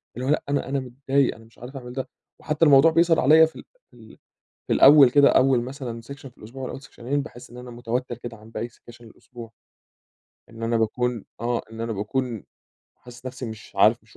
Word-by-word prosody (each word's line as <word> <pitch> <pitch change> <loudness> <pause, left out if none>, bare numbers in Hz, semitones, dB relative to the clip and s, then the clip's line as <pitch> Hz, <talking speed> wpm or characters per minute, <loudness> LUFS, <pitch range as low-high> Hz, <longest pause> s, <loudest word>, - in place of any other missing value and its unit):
اللي 125 +2 -5
هو - - 0
لأ، 150 - +1
أنا 140 -1 -1
أنا 140 - -1
متضايق، 135 +1 -1
أنا 115 - -16
مش 115 - -24
عارف 125 +3 -9
أعمل 125 -2 -9
ده. 130 0 -5 0.3
وحتّى 150 +2 0
الموضوع 145 +2 +6
بيظهر 165 0 +3
عليَا 155 +4 +6
في 160 - -9
ال - - -10 0.3
في - - -21
ال - - -16 0.5
في - - -1
الأول 140 -3 +7
كده، 140 +1 +6
أول 130 -2 +3
مثلًا 125 -3 -7
سكشن 135 +3 -11
في 125 - -23
الأسبوع 125 +5 -10
والّا - - -5
أول 135 - -9
سكشنين، 140 +1 -4
باحِس 125 -4 -12
إن 120 - -13
أنا 125 0 -10
متوتّر 120 +1 -4
كده 120 -1 -8
عن 110 +1 -16
باقي 115 +1 -5
سكاشن 120 0 -17
الأسبوع. 115 0 -13 1.0
إن 115 0 -10
أنا 115 0 0
باكون 120 +1 -1
آه. 120 +1 -1
إن 115 0 -8
أنا 115 0 -3
باكون 115 +2 -3 0.5
حاسِس 125 +1 -14
نفسي 130 0 -6
مش 110 -2 -10
عارف، 110 +3 +4
مش 115 - -22
125 Hz, 215 wpm, -24 LUFS, 115-135 Hz, 1.0 s, الأول